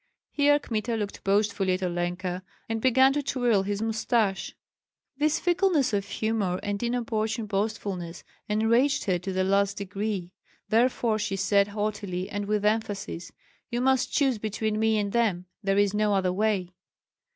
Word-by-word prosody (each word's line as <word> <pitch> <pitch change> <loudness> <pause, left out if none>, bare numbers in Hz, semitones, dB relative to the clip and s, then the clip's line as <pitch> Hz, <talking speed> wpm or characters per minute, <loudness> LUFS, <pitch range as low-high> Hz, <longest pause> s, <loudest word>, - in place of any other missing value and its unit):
Here 290 0 +4
Kmita 230 -4 -2
looked 205 -2 -4
boastfully 200 -1 +1
at 185 +1 -2
Olenka, 180 +1 -2 0.3
and 225 0 -2
began 260 +2 +5
to 290 - 0
twirl 245 -7 +1
his 205 +2 -2
mustache. 220 -2 0 0.6
This 300 +1 +2
fickleness 350 - +2
of 200 -1 0
humor 210 -5 -1
and 205 0 -2
inopportune 225 -2 -1
boastfulness 200 -4 -3 0.3
enraged 230 +6 +2
her 185 -4 0
to 190 +2 -4
the 185 0 0
last 200 +1 +2
degree; 200 -2 -3 0.4
therefore 230 -1 +2
she 205 -1 -1
said 200 +1 +3
haughtily 205 -3 -3
and 205 -1 -3
with 210 0 0
emphasis, 205 -5 -2 0.4
"You 240 - -2
must 265 -1 +2
choose 270 -6 +2
between 215 0 -2
me 220 0 +3
and 205 -1 -1
them; 205 -6 +1 0.2
there 195 -1 +1
is 205 -1 +3
no 210 -1 +2
other 185 -2 +1
way." 200 -3 0
210 Hz, 150 wpm, -27 LUFS, 195-225 Hz, 0.6 s, began